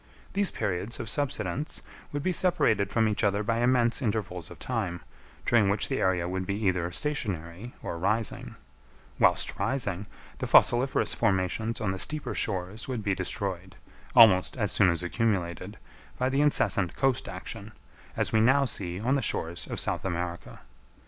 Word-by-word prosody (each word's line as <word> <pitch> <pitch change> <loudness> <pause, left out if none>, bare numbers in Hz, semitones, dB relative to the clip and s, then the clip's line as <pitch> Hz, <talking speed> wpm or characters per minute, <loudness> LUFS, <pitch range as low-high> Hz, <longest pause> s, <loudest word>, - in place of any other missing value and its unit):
These 200 -1 +2
periods 95 +4 -3
of - - -5
subsidence 135 - -2 0.3
would 145 0 -3
be 185 - +1
separated 145 - +2
from 110 +1 +2
each 105 +1 -1
other 100 0 +2
by 115 +2 0
immense 120 +1 +2
intervals 100 - -2
of - - -11
time, 95 -9 -3 0.4
during 110 -5 +4
which 100 +1 0
the 135 - -1
area 90 -2 +1
would 95 +1 -3
be 100 - -1
either 90 -4 0
stationary 100 - -3
or 85 - -4
rising; 110 +5 -1 0.6
whilst - - +3
rising, 105 -7 -1 0.3
the - - -2
fossiliferous 125 +3 +4
formations 110 +2 0
on 100 -3 -1
the 95 - -4
steeper 155 +7 0
shores 95 +2 -3
would 125 -5 -3
be 100 -1 +1
destroyed, 95 0 -4 0.4
almost 100 -1 +6
as 105 -4 0
soon 100 -3 +4
as 85 0 -1
accumulated, 90 -3 -2 0.4
by 130 +1 +1
the 135 +2 +1
incessant 100 - +2
coast 135 -2 0
action, - - -7 0.5
as - - -1
we 110 - +4
now 135 +4 +4
see 90 -7 -2
on 125 +6 0
the 140 - +1
shores 85 -7 -3
of - - -4
South - - -2
America. 85 -2 -4
105 Hz, 160 wpm, -28 LUFS, 90-120 Hz, 0.6 s, almost